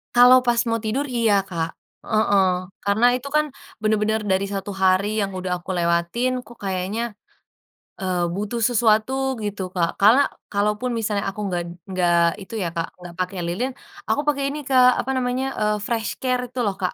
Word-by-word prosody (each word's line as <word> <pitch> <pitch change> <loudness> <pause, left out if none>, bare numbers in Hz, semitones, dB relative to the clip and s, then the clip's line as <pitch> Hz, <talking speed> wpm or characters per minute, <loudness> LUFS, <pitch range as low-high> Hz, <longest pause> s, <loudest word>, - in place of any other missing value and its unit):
Kalau 245 +1 +8
pas 240 -1 +3
mau 230 0 +1
tidur, 255 +7 0
iya, 230 -3 +3
Kak, 165 -3 -2 0.4
heeh, 205 -2 +3 0.4
karena 200 +4 +2
itu 255 +2 -5
kan 305 0 +4 0.4
bener-bener 215 0 +1
dari 190 +1 +2
1 195 +1 -4
hari 190 +2 +4
yang 195 -1 -1
udah 185 0 -4
aku 175 - -15
lewatin 170 +9 +1
kok 240 - -14
kayaknya, 190 +3 -2 1.0
eee, 185 -2 -1
butuh 210 +4 -3
sesuatu 220 0 +3 0.3
gitu, 205 -1 -3
Kak. 170 -2 +2
Karena 225 +7 +7 0.3
kalaupun 210 +4 0
misalnya 210 -2 -1
aku 195 - -9
nggak 175 -2 -1 0.3
nggak 175 -2 +2 0.3
itu 195 - -11
ya 170 - -1
Kak, 165 0 -1
nggak 175 -1 -10
pakai 185 +1 -2
lilin, 240 +10 -2 0.4
aku 290 - +2
pakai 280 -2 +1
ini 295 +2 -4
Kak, 255 -1 +6
apa 265 - -3
namanya, 250 +1 -1
eee, 210 0 +2
FreshCare 250 +2 -1
itu 255 - -6
loh, 200 - 0
Kak. 180 - 0
210 Hz, 170 wpm, -22 LUFS, 190-240 Hz, 1.0 s, Kalau